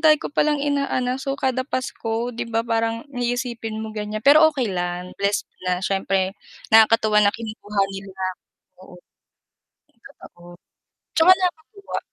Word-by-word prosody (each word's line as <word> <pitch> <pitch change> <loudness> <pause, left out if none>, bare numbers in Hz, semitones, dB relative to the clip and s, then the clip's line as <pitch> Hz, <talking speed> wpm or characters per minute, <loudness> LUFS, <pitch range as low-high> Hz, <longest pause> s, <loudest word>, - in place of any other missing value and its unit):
dami 310 -1 +6
ko - - -5
palang 295 0 +2
inaanak, 275 -3 0
so, 275 0 -2
kada 260 -1 0
Pasko, 240 -3 -3
di 230 - -5
ba, 225 0 0
parang 230 0 -1
iisipin 240 -3 -3
mo 220 - -6
ganyan. 215 0 -5
Pero 305 +5 +7
okay 260 -9 -2
lang 180 0 -3
blessed 200 +1 -1 0.2
na 180 0 0
siyempre 190 -1 0 0.4
nakakatuwa 220 -1 +5
na 205 +1 +4
kinukuha 215 -2 -4
nila 195 -1 -8 0.6
ako. 180 -1 -15 1.0
Totoo, 175 -10 -14 0.6
tsaka 340 +3 +7
nakakatuwa. 370 +2 -4
225 Hz, 135 wpm, -22 LUFS, 200-265 Hz, 1.0 s, Pero